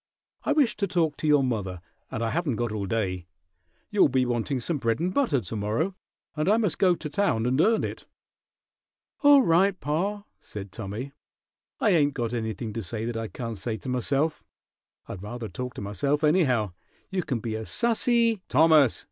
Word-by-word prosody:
"I 295 Hz, -, +2 dB
wish 285 Hz, -6 st, +3 dB
to 200 Hz, -1 st, 0 dB
talk 165 Hz, -4 st, +1 dB
to 155 Hz, -, -2 dB
your 145 Hz, -2 st, +5 dB
mother, 100 Hz, -8 st, -2 dB, 0.3 s
and 110 Hz, -, -3 dB
I 115 Hz, -, -1 dB
haven't 165 Hz, -7 st, 0 dB
got 120 Hz, 0 st, -2 dB
all 105 Hz, -2 st, -3 dB
day. 95 Hz, -4 st, -2 dB, 0.6 s
You'll 205 Hz, -7 st, +4 dB
be 130 Hz, 0 st, +2 dB
wanting 120 Hz, +2 st, -1 dB
some 145 Hz, +5 st, -1 dB
bread 115 Hz, 0 st, 0 dB
and 180 Hz, +3 st, -1 dB
butter 190 Hz, -, +2 dB
to 105 Hz, +3 st, -6 dB
morrow, 110 Hz, -, -1 dB, 0.4 s
and 155 Hz, +3 st, 0 dB
I 215 Hz, -, +5 dB
must 210 Hz, -7 st, 0 dB
go 185 Hz, -2 st, +4 dB
to 160 Hz, -, -6 dB
town 150 Hz, -, 0 dB
and 130 Hz, +4 st, +2 dB
earn 225 Hz, +3 st, +3 dB
it." -, -, -5 dB, 1.1 s
"All 285 Hz, -2 st, +7 dB
right, 185 Hz, +1 st, +3 dB
pa," 195 Hz, +8 st, -1 dB, 0.2 s
said 100 Hz, -2 st, -8 dB
Tommy. 110 Hz, +7 st, -5 dB, 0.7 s
"I 210 Hz, -, +3 dB
ain't 145 Hz, -5 st, +3 dB
got 120 Hz, -2 st, -2 dB
anything 110 Hz, -1 st, -3 dB
to 115 Hz, -, -3 dB
say 110 Hz, +3 st, -4 dB
that 120 Hz, 0 st, -3 dB
I 115 Hz, 0 st, -3 dB
can't 115 Hz, +2 st, -6 dB
say 110 Hz, +1 st, -3 dB
to 130 Hz, -, -7 dB
myself. 135 Hz, +5 st, 0 dB, 0.6 s
I'd 95 Hz, -, -7 dB
rather 115 Hz, +3 st, -6 dB
talk 125 Hz, +2 st, -6 dB
to -, -, -6 dB
myself, 140 Hz, +9 st, -1 dB
anyhow. 135 Hz, -, +3 dB, 0.4 s
You 190 Hz, -1 st, 0 dB
can 130 Hz, -8 st, -2 dB
be 110 Hz, -1 st, -4 dB
as 110 Hz, 0 st, -5 dB
sassy 235 Hz, -2 st, +2 dB
" -, -, -52 dB
"Thomas!" 155 Hz, -5 st, +5 dB
130 Hz, 190 wpm, -26 LUFS, 110-175 Hz, 1.1 s, All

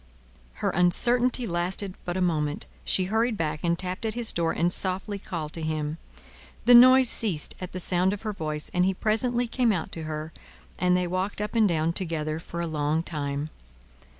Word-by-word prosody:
Her -, -, +2 dB
uncertainty 240 Hz, +8 st, +4 dB
lasted 185 Hz, +1 st, -2 dB
but 175 Hz, +1 st, -3 dB
a -, -, -1 dB
moment; 150 Hz, -4 st, -1 dB, 0.2 s
she 185 Hz, -, +2 dB
hurried 220 Hz, +4 st, 0 dB
back, 155 Hz, -3 st, -2 dB
and 170 Hz, 0 st, +1 dB
tapped 185 Hz, +2 st, -4 dB
at 220 Hz, 0 st, -2 dB
his 240 Hz, -2 st, 0 dB
door, 165 Hz, -1 st, 0 dB
and 175 Hz, +1 st, 0 dB
softly 190 Hz, +2 st, 0 dB
called 155 Hz, -5 st, -6 dB
to 165 Hz, -, -5 dB
him. 155 Hz, 0 st, -3 dB, 0.7 s
The 245 Hz, -, +7 dB
noise 255 Hz, +2 st, +8 dB
ceased 195 Hz, -10 st, +2 dB
at 185 Hz, -, -6 dB
the 185 Hz, -, -5 dB
sound 180 Hz, +1 st, +2 dB
of 205 Hz, +1 st, -6 dB
her 215 Hz, -2 st, -3 dB
voice, 155 Hz, -5 st, -4 dB
and 180 Hz, -, +2 dB
he 190 Hz, +1 st, +1 dB
presently 240 Hz, +4 st, +1 dB
came 240 Hz, 0 st, +1 dB
out 175 Hz, -6 st, -3 dB
to 160 Hz, -1 st, -6 dB
her, 155 Hz, +1 st, -5 dB, 0.5 s
and 180 Hz, 0 st, +3 dB
they 180 Hz, -, 0 dB
walked 185 Hz, +4 st, -3 dB
up 210 Hz, 0 st, -4 dB
and 225 Hz, -3 st, +4 dB
down 165 Hz, 0 st, 0 dB
together 160 Hz, -4 st, -2 dB
for 170 Hz, +1 st, -6 dB
a -, -, -1 dB
long 155 Hz, 0 st, -1 dB
time. 145 Hz, -2 st, -4 dB
180 Hz, 195 wpm, -26 LUFS, 160-210 Hz, 0.7 s, noise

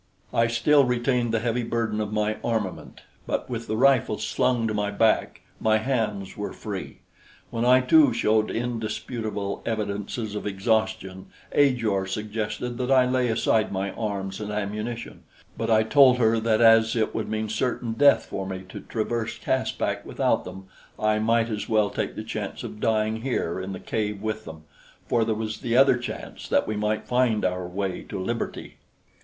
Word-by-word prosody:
I 115 Hz, 0 st, +3 dB
still 140 Hz, +5 st, +4 dB
retained 125 Hz, -1 st, +1 dB
the 115 Hz, -1 st, 0 dB
heavy 120 Hz, +1 st, 0 dB
burden 115 Hz, -2 st, -1 dB
of 105 Hz, -1 st, -3 dB
my 105 Hz, 0 st, 0 dB
armament; 110 Hz, -6 st, -3 dB, 0.3 s
but -, -, -2 dB
with 115 Hz, -1 st, -4 dB
the 110 Hz, -, -1 dB
rifle 130 Hz, -4 st, +3 dB
slung 125 Hz, -3 st, 0 dB
to 110 Hz, -, -2 dB
my 105 Hz, -1 st, 0 dB
back, 110 Hz, +2 st, +1 dB, 0.2 s
my 110 Hz, 0 st, +3 dB
hands 110 Hz, -5 st, -2 dB
were 105 Hz, -, -5 dB
free. -, -, -7 dB, 0.5 s
When 115 Hz, +1 st, -1 dB
I 130 Hz, +1 st, +6 dB
too 145 Hz, +1 st, +5 dB
showed 110 Hz, -1 st, +2 dB
indisputable 110 Hz, -3 st, -3 dB
evidences 105 Hz, 0 st, -3 dB
of 105 Hz, -, -4 dB
exhaustion, 105 Hz, -1 st, -1 dB, 0.2 s
Ajor 115 Hz, -9 st, +2 dB
suggested 110 Hz, +4 st, -4 dB
that 125 Hz, 0 st, -1 dB
I 130 Hz, -2 st, +5 dB
lay 125 Hz, 0 st, +1 dB
aside 110 Hz, -1 st, +1 dB
my 95 Hz, +1 st, -2 dB
arms 100 Hz, -2 st, -4 dB
and 105 Hz, 0 st, -4 dB
ammunition; 105 Hz, +3 st, -4 dB, 0.3 s
but -, -, -3 dB
I 110 Hz, -1 st, +5 dB
told 130 Hz, +2 st, +6 dB
her 115 Hz, -1 st, +3 dB
that 110 Hz, 0 st, +2 dB
as 115 Hz, 0 st, +6 dB
it 110 Hz, -2 st, 0 dB
would -, -, -3 dB
mean 110 Hz, 0 st, -2 dB
certain 115 Hz, +1 st, -1 dB
death 140 Hz, +4 st, +5 dB
for 95 Hz, -1 st, -5 dB
me 95 Hz, -1 st, -5 dB
to -, -, -7 dB
traverse 115 Hz, 0 st, -3 dB
Caspak -, -, -1 dB
without -, -, 0 dB
them, 95 Hz, +1 st, -9 dB, 0.3 s
I 110 Hz, 0 st, +1 dB
might 115 Hz, +1 st, +2 dB
as 105 Hz, -2 st, -4 dB
well 105 Hz, -2 st, +2 dB
take -, -, -3 dB
the -, -, -5 dB
chance -, -, -5 dB
of 105 Hz, -, -7 dB
dying 110 Hz, 0 st, +1 dB
here 115 Hz, -9 st, -1 dB
in 95 Hz, +1 st, -5 dB
the 95 Hz, -, -6 dB
cave 105 Hz, -2 st, -2 dB
with 110 Hz, +1 st, -4 dB
them, 80 Hz, -1 st, -10 dB, 0.4 s
for 115 Hz, -1 st, +2 dB
there 110 Hz, -1 st, 0 dB
was 110 Hz, 0 st, -4 dB
the 120 Hz, 0 st, 0 dB
other 135 Hz, -2 st, +6 dB
chance 120 Hz, -, -7 dB
that -, -, +2 dB
we 110 Hz, -, -2 dB
might 105 Hz, +1 st, -1 dB
find 125 Hz, -5 st, +2 dB
our 90 Hz, -1 st, -1 dB
way 95 Hz, +1 st, -3 dB
to -, -, -4 dB
liberty. 115 Hz, +5 st, -4 dB
110 Hz, 175 wpm, -25 LUFS, 105-120 Hz, 0.5 s, I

